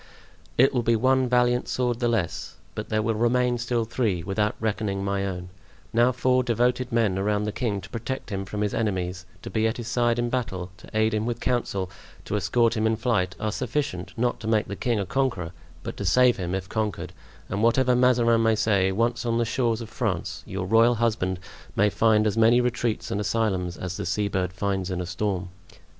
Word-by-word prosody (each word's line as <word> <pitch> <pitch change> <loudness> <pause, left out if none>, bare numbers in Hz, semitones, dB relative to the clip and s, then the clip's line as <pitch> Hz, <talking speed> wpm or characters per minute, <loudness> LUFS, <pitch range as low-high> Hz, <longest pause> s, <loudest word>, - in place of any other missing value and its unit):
"It 130 +3 +5
will 125 - +2
be 115 0 +2
one 130 +2 +2
valiant 125 0 +2
sword 120 -2 -1
the 120 - +1
less, 110 -8 -2 0.2
but - - -6
there 110 0 +1
will 115 +1 +1
remain 120 +2 +2
still 120 -1 0
three, 110 -7 -1
without 105 +3 0
reckoning 105 -3 -1
my 100 0 -1
own; 90 -1 -5 0.4
now 120 +2 +4
four 130 +1 +2
devoted 125 +1 +1
men 110 -5 +2
around 105 +1 +1
the 105 - -1
king 105 -4 -2
to 100 - -11
protect 115 0 -5
him 95 -1 -2
from 105 +2 -5
his 105 -1 0
enemies, 90 -5 -2 0.2
to - - -7
be 110 0 +2
at 110 - -2
his 120 -2 -6
side 120 -1 +1
in 120 0 -1
battle, 95 -8 -3
to - - -14
aid 110 +1 +2
him 110 +1 0
with 120 -1 -2
counsel, 100 -8 -1 0.3
to - - -2
escort 115 +4 +2
him 110 0 +1
in 110 - +2
flight, 105 -5 0
are 110 - -1
sufficient, 105 -8 -2
not 120 +1 0
to 110 - -6
make 110 -1 +2
the 100 - -5
king 115 +3 0
a 100 - -1
conqueror, 100 -7 -1 0.3
but - - -5
to - - -4
save 125 -2 +4
him 90 0 -2
if 95 -1 -4
conquered; 95 -4 -3 0.3
and 100 +2 -2
whatever 125 +2 +3
Mazarin 120 -2 +4
may 110 0 +3
say, 100 -3 +2
once 120 +4 0
on 115 -1 0
the 120 - +2
shores 115 -1 0
of 115 - -7
France 100 -9 -2
your 95 0 -3
royal 115 +4 +4
husband 105 -5 0 0.4
may 105 0 +3
find 110 0 +3
as 105 - +1
many 115 +2 +5
retreats 120 -2 -1
and 105 - -1
asylums 95 -5 -1
as 90 0 -5
the - - -3
seabird 95 -2 0
finds 95 0 -2
in 90 -1 -2
a 90 - -2
storm." 95 0 -2
110 Hz, 210 wpm, -25 LUFS, 95-120 Hz, 0.4 s, It